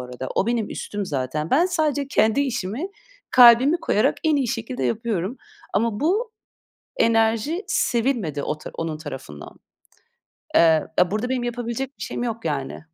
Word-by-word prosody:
arada. 125 +1 -6
O, 200 - +1
benim 235 -3 -1
üstüm 205 -2 -4
zaten. 145 +2 -3
Ben, 335 +7 +4
sadece 300 -6 0
kendi 220 +1 +2
işimi 250 - -2 0.4
kalbimi 250 +5 +7
koyarak 210 - +1
en 310 -2 +3
iyi 260 -4 0
şekilde 235 +1 -3
yapıyorum. 220 -1 -2 0.4
Ama 215 0 0
bu 425 +9 0 0.6
enerji 230 - +2
sevilmedi 230 - 0
o 150 - -3
ta - - -9
onun 160 -2 -4
tarafından. 130 - -9 1.0
Eee, 160 -2 +5
eee, 180 +1 +3
burada 220 +4 -1
benim 255 -2 -1
yapabilecek 240 +2 -4
bir 200 - -6
şeyim 240 - -4
yok, 230 -5 -4
yani. 140 -3 -3
230 Hz, 150 wpm, -23 LUFS, 170-260 Hz, 1.0 s, kalbimi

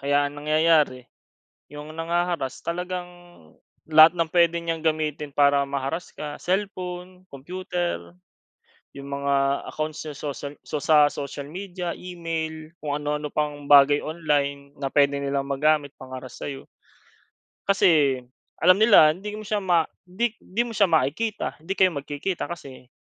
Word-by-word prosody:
kaya 145 +1 +2
ang 145 +1 -7
nangyayari, 155 -4 +3 0.7
'yong 150 +1 -8
nangha-harass 170 -4 -1
talagang 180 +1 -3 0.8
lahat 155 +1 +9
ng 165 -1 0
puwede 170 -1 +3
niyang 165 -1 -3
gamitin 150 -2 -1
para 140 -1 +4
ma-harass 140 +5 -4
ka, 150 -1 -6
cellphone, 185 -1 -3
computer, 175 - -4 0.8
'yong 140 0 -8
mga 140 0 0 0.4
accounts 155 0 -4
sa 155 - -5
social, 145 0 -6
so - - -4
sa 150 -1 +6
social 140 0 -6
media, 180 0 -5
email, 160 -3 -5
kung 145 -1 -2
ano-ano 150 0 -2
pang 150 -1 -2
bagay 145 0 +7
online, 145 -3 -2
na 135 - -2
puwede 140 -1 +4
nilang 140 0 -1
magamit 145 +1 +1
pang-harass 130 -1 -9
sa'yo. 140 -2 -6 1.0
Kasi, 155 -9 +4 0.4
alam 180 +2 +6
nila 200 -9 +7
hindi 205 +4 -7
mo 215 - -7
siya 210 +1 0
ma 170 -4 +3 0.2
'di 205 +6 -2
'di 225 +6 -2
mo 230 - -6
siya 200 -4 +3
makikita, 165 - 0
hindi 190 +4 -3
kayo 185 -3 +4
magkikita, 145 +7 -4
kasi, 135 -7 -9
155 Hz, 140 wpm, -24 LUFS, 140-175 Hz, 1.0 s, lahat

